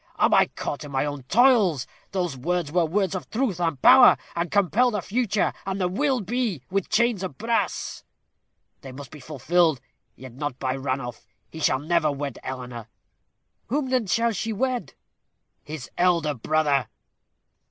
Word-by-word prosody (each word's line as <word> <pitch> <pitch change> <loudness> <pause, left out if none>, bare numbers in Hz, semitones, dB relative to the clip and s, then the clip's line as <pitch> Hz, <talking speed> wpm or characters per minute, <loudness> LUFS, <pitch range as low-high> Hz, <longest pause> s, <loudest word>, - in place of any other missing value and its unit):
Am - - +3
I - - +5
caught 145 - -5
in 145 - -8
my 135 +1 0
own 145 -1 -4
toils? 215 - +4 0.3
Those 180 -6 -2
words 165 +3 -2
were 175 0 +2
words 190 +2 0
of 185 - -5
truth 220 -7 -1
and 165 -5 -1
power, 255 -2 +8 0.2
and 170 0 -1
compel 205 +7 +3
the 210 -3 -2
future 210 +1 0
and 195 0 -3
'the 180 -1 +1
will 265 +5 0
be' 235 0 -1
as 130 0 -19
with 195 -1 -1
chains 235 -3 +2
of 180 -8 -5
brass. 230 +4 -2 0.8
They 135 - -9
must 135 -1 -10
be 150 - -11
fulfilled, 155 +2 +1 0.4
yet 130 -1 -11
not 135 0 -4
by 130 -1 -2
Ranulph. 130 -3 -4 0.2
He 160 - -8
shall 130 - +2
never 155 +1 +1
wed 140 -2 -5
Eleanor." 125 -3 -7 0.8
"Whom 265 +1 -1
then 250 -5 +1
shall 230 +5 +2
she 225 +2 -3
wed?" 250 +3 -2 0.7
"His 150 -4 -8
elder 170 -4 +2
brother." 145 -1 +1
175 Hz, 165 wpm, -24 LUFS, 140-210 Hz, 0.8 s, power